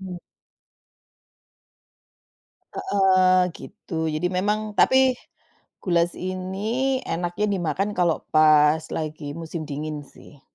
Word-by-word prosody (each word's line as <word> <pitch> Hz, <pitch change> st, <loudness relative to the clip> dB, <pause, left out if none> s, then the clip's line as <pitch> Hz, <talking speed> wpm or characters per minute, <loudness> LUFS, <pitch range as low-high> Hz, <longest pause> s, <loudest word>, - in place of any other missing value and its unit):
Mhm. 185 Hz, -2 st, -7 dB, 2.6 s
Heeh. 190 Hz, -, +3 dB, 0.2 s
Gitu. 175 Hz, -5 st, -7 dB
Jadi 165 Hz, +3 st, -1 dB
memang, 210 Hz, +3 st, -1 dB
tapi 260 Hz, 0 st, +5 dB, 0.7 s
goulash 170 Hz, -1 st, +1 dB
ini 200 Hz, +9 st, -2 dB
enaknya 175 Hz, +4 st, -2 dB
dimakan 185 Hz, +3 st, -1 dB
kalau 170 Hz, -2 st, +1 dB
pas 155 Hz, 0 st, +5 dB
lagi 155 Hz, -2 st, -5 dB
musim 165 Hz, 0 st, -6 dB
dingin 150 Hz, +1 st, -4 dB
sih. 140 Hz, +1 st, -17 dB
180 Hz, 90 wpm, -23 LUFS, 155-200 Hz, 2.6 s, tapi